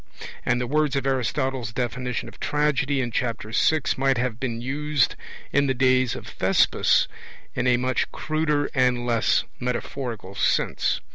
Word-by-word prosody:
And 125 - +1
the 125 - -1
words 150 +2 +1
of 135 -1 -1
Aristotle's 130 -2 -1
definition 125 +1 -3
of - - -13
tragedy 145 -2 +1
in 120 -2 -3
Chapter 115 -3 -2
VI 155 +6 +3 0.2
might 135 -1 +2
have 120 -2 -1
been 120 -3 -3
used 145 +2 0 0.4
in 140 +1 +3
the 130 - +1
days 130 -1 +3
of - - -8
Thespis - - +2 0.5
in 120 - -1
a 125 -1 +4
much 130 +1 0
cruder 155 -2 0
and 125 -2 +2
less 115 -2 +2 0.2
metaphorical 125 -4 -4
sense. 100 - +1
130 Hz, 150 wpm, -24 LUFS, 120-140 Hz, 0.5 s, a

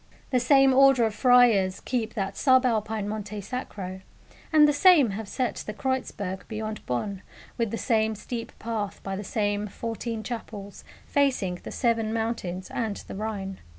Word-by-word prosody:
The 255 - +3
same 270 +1 +5
order 270 -2 +6
of 220 - -1
friars 220 -5 +4
keep 230 -3 -3
that 195 -2 -2
sub 260 -1 +4
Alpine 215 -3 0
Monte 210 0 -5
Sacro, 195 -4 -6 0.5
and 305 -2 +7
the 295 - +3
same 290 - +6
have 210 +2 -5
set 255 -2 -2
the 210 - -6
Kreuzberg 205 -6 -3
beyond 215 -1 -5
Bonn 190 - -2 0.3
with 230 -2 -1
the 230 - -3
same 220 -3 +1
steep 230 +2 -6
path 220 -3 -4
by 195 0 -3
the 205 - -5
same 205 0 -1
fourteen 225 +1 -5
chapels, 210 -4 -7 0.2
facing 250 -11 +1
the - - -8
Seven 230 -3 0
Mountains 220 -5 -3
and 220 -4 -2
the - - -7
Rhine. 195 -2 -4
220 Hz, 160 wpm, -26 LUFS, 200-245 Hz, 0.5 s, and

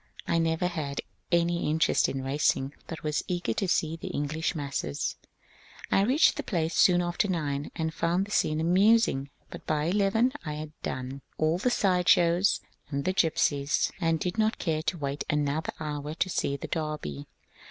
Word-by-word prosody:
I 170 - +2
never 165 +1 +1
had 155 -6 -2 0.3
any 170 -1 +2
interest 160 +1 +2
in 135 -1 -3
racing, 135 0 +1
but 165 - -7
was 150 -1 -1
eager 175 -10 -1
to 195 - -1
see 160 -2 +1
the 165 - -8
English 155 +4 -2
masses. 140 - -3 0.8
I - - +4
reached 260 +10 +4
the - - -1
place 165 -3 -1
soon 175 -1 +5
after 175 +4 0
nine, 150 -6 -2
and 160 -1 -2
found 170 +4 +1
the 205 - -12
scene 155 -6 +1
amusing; 180 - +3 0.2
but - - -10
by 150 -1 +1
eleven 205 +8 +2
I 150 -3 -4
had 155 +1 -5
^ - - -23
done 130 +1 -4
" - - -39
all 155 +3 +1
the 250 - +2
side 185 -6 +2
shows 175 +3 +4 0.3
and 140 -1 -3
gypsies, 165 -5 +2
etc., 140 - 0
and 165 -1 +2
did 180 +6 -2
not 220 +1 +2
care 155 -3 -1
to 160 +3 -2
wait 140 -1 -3
another 150 +1 0
hour 150 0 -4
to 185 - 0
see 140 -3 -1
the - - -6
Derby. 150 - -4
160 Hz, 185 wpm, -28 LUFS, 145-180 Hz, 0.8 s, soon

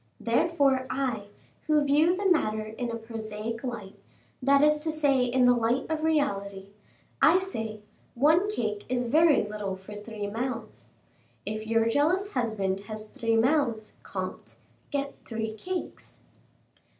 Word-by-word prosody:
Therefore, 265 +1 +2
I, 245 -7 -2 0.4
who 305 -1 +4
view 305 +5 +4
the 400 - -3
matter 220 - +2
in 225 +3 -5
a 230 - -3
prosaic 225 0 -6
light, 230 -6 -6 0.4
that 280 +2 +4
is 300 0 +4
to 315 +1 -2
say 285 -5 +2
in 250 +1 +3
the 245 - +6
light 240 +2 +1
of 315 -1 -1
reality, 200 -11 0 0.5
I 330 +3 +7
say: 225 - -4 0.3
one 315 +10 +4
cake 215 - -2
is 250 -1 0
very 305 +5 +4
little 210 -2 -4
for 190 +2 -11
three 210 0 -6
mouths. 230 +1 -5 0.6
If 215 +1 -4
your 225 0 +2
jealous 335 - +1
husband 205 -6 -1
has 215 0 -5
three 230 -1 0
mouths, 230 -3 +1
comte, - - -6 0.3
get 280 0 -2
three 220 -1 -4
cakes." 360 - -6
240 Hz, 140 wpm, -28 LUFS, 215-290 Hz, 0.6 s, I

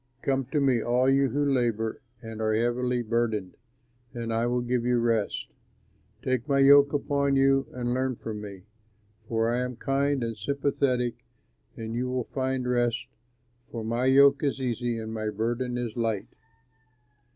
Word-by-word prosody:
"Come 135 -1 0
to 145 +4 -1
me, 130 -4 +2
all 125 +3 +2
you 135 0 +3
who 145 +4 0
labor 115 -5 0 0.2
and 110 -1 -7
are 110 0 +1
heavily 120 +2 0
burdened, 110 -4 -1 0.6
and 115 -1 -3
I 115 +1 +1
will 125 0 0
give 120 0 -1
you 125 0 +2
rest. 115 -3 0 0.7
Take 130 -2 -1
my 140 - +3
yoke 140 +1 +7
upon 140 -1 +1
you 135 0 +3
and 120 -1 -2
learn 130 -1 -1
of 110 - -3
me, 100 -3 -8 0.6
for 115 0 +1
I 120 - 0
am 125 0 -3
kind 135 +1 0
and 115 -1 -3
sympathetic, 130 +1 -1 0.5
and 115 0 -5
you 125 +2 -2
will 125 -1 -1
find 130 0 -2
rest, 120 -2 0 0.6
for 115 -2 -5
my 120 +3 -1
yoke 140 +1 +6
is 140 -1 0
easy 120 -2 -2
and 110 0 -5
my 110 -1 -2
burden 120 +4 -2 0.2
light. 115 -4 -1
125 Hz, 160 wpm, -27 LUFS, 115-135 Hz, 0.7 s, yoke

